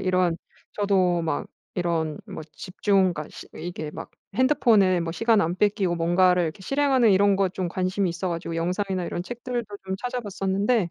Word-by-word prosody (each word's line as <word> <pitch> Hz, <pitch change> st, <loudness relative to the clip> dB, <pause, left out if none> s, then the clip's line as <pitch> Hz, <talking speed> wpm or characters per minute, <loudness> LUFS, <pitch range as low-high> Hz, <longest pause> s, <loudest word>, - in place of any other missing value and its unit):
이런 185 Hz, -3 st, +1 dB, 0.4 s
저도 185 Hz, -4 st, +2 dB
막 160 Hz, -3 st, -2 dB, 0.3 s
이런 165 Hz, -4 st, -1 dB
뭐 -, -, -7 dB
집중 190 Hz, -1 st, +1 dB
그러니까 150 Hz, 0 st, -5 dB
스 -, -, -10 dB
이게 165 Hz, -3 st, -5 dB
막 -, -, -8 dB, 0.2 s
핸드폰을 220 Hz, -8 st, +4 dB
뭐 165 Hz, -1 st, -3 dB
시간 225 Hz, +1 st, +3 dB
안 170 Hz, +2 st, 0 dB
뺏기고 195 Hz, -3 st, +1 dB
뭔가를 180 Hz, +2 st, +3 dB
이렇게 165 Hz, +4 st, -3 dB
실행하는 265 Hz, 0 st, +3 dB
이런 200 Hz, +1 st, +4 dB
거 195 Hz, -1 st, +2 dB
좀 180 Hz, -1 st, -3 dB
관심이 185 Hz, +1 st, 0 dB
있어 175 Hz, +2 st, -3 dB
가지고 170 Hz, -1 st, -4 dB
영상이나 185 Hz, +2 st, -1 dB
이런 175 Hz, -, -3 dB
책들도 240 Hz, +1 st, -4 dB, 0.2 s
좀 190 Hz, 0 st, -2 dB
찾아 245 Hz, +3 st, -3 dB
봤었는데 200 Hz, -1 st, 0 dB
185 Hz, 370 characters per minute, -25 LUFS, 175-205 Hz, 0.4 s, 핸드폰을